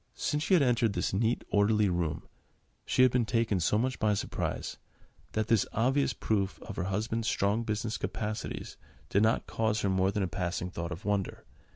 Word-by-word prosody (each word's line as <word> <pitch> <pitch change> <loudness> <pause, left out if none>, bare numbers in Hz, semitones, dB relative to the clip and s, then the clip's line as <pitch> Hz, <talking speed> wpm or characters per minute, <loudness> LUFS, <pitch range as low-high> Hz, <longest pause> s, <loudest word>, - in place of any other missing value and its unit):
Since 150 - -1
she 185 +5 +3
had 160 - +5
entered 120 -4 +2
this - - -1
neat, 115 +4 +1
orderly 105 +1 +3
room, 85 -4 -1 0.6
she 130 - +4
had 130 - +6
been 125 -1 +2
taken 115 -5 +1
so 90 +5 +2
much 125 +3 -1
by 105 -2 +2
surprise, - - -3 0.6
that 110 0 0
this 110 -2 +2
obvious 130 +5 +2
proof 100 -3 -1
of 110 - -7
her 90 - -1
husband's 110 +4 -1
strong 100 +2 +1
business 110 0 -2
capacities 110 0 -4 0.3
did 100 - +3
not 110 +1 +2
cause 110 -1 0
her 100 - +1
more 95 0 +2
than 100 0 -1
a - - 0
passing 90 +1 -3
thought 85 0 -4
of 90 +5 -7
wonder. 100 -2 -1
105 Hz, 190 wpm, -30 LUFS, 95-115 Hz, 0.6 s, had